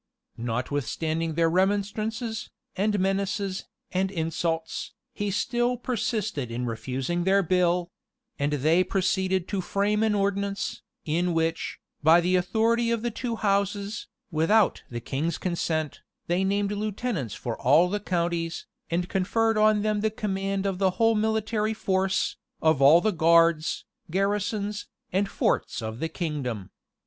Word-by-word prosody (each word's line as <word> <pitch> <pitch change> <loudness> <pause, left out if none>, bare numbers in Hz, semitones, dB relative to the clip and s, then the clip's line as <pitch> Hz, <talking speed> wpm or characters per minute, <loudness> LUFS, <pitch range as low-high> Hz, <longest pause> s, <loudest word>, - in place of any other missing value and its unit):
Notwithstanding 145 +7 -2
their 165 0 +3
remonstrances, 205 +5 0 0.3
and 205 +1 +1
menaces, 195 0 -1 0.3
and 190 +1 +1
insults, 165 -2 -2 0.2
he 205 -2 -2
still 240 +4 0
persisted 220 - -2
in 120 +2 -3
refusing 130 +8 -2
their 195 +2 +3
bill; 180 0 +1 0.5
and 145 +1 +1
they 155 +6 +3
proceeded 190 -1 0
to 200 -2 -1
frame 205 +3 0
an 220 -1 +2
ordinance, 200 0 -1 0.2
in 170 +2 0
which, 165 0 -1 0.2
by 160 +3 +7
the 180 +2 +2
authority 225 +6 +2
of 230 -1 0
the 240 - -1
two 235 +1 -3
houses, 200 0 -1 0.2
without 185 +7 +3
the 120 -1 -5
king's 150 +7 -2
consent, 160 -4 -2 0.2
they 175 +2 +1
named 200 +1 +1
lieutenants 210 - -2
for 120 -2 -4
all 150 +8 +5
the 205 +3 -1
counties, 170 -3 -2 0.2
and 175 +2 0
conferred 225 +5 +1
on 215 -1 +4
them 215 -1 +1
the 220 - +2
command 195 -2 -2
of 190 -2 -1
the 190 -1 +4
whole 225 -1 +4
military 220 0 0
force, 190 -2 0 0.2
of 160 -3 +3
all 150 +5 +8
the 215 - +2
guards, 165 -2 +3 0.2
garrisons, 205 +2 -1 0.3
and 195 +1 +1
forts - - 0
of 110 0 -5
the 160 - -2
kingdom. 140 - -4
190 Hz, 135 wpm, -26 LUFS, 165-210 Hz, 0.5 s, all